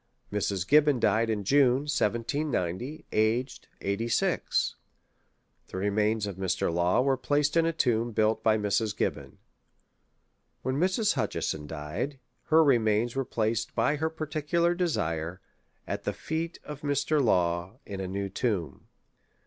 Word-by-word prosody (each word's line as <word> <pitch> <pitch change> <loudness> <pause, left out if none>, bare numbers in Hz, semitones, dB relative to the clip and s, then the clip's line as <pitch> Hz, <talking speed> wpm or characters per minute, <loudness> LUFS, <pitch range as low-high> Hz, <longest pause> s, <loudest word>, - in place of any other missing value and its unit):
Mrs. 100 -2 -1
Gibbon 145 -3 +5
died 115 0 +2
in 105 -2 -1
June, 135 +3 +4
1790, 125 - -1
aged 115 +4 0
86. 110 +3 0 0.9
The - - -7
remains 105 +2 +1
of 100 -3 -6
Mr. 95 -3 0
Law 85 +7 +2
were 135 0 +2
placed 145 +4 0
in 165 0 +4
a - - +2
tomb 120 -6 +1
built 110 0 +1
by 110 -1 +3
Mrs. 105 0 0
Gibbon. - - -2 1.3
When 130 +1 -1
Mrs. 190 +5 +2
Hutcheson 75 -1 -2
died, 80 - -4 0.3
her 160 +1 +5
remains 115 -3 +2
were 135 - 0
placed, 115 -1 -1
by 120 +6 +2
her 160 +2 0
particular 160 +2 0
desire, 85 - -1 0.5
at - - -4
the - - 0
feet 165 +2 -4
of 150 -1 -8
Mr. 145 +1 +1
Law, 90 -1 +1
in 100 -2 -6
a 95 - -3
new 100 +1 -3
tomb. 95 - -2
115 Hz, 135 wpm, -28 LUFS, 100-145 Hz, 1.3 s, Gibbon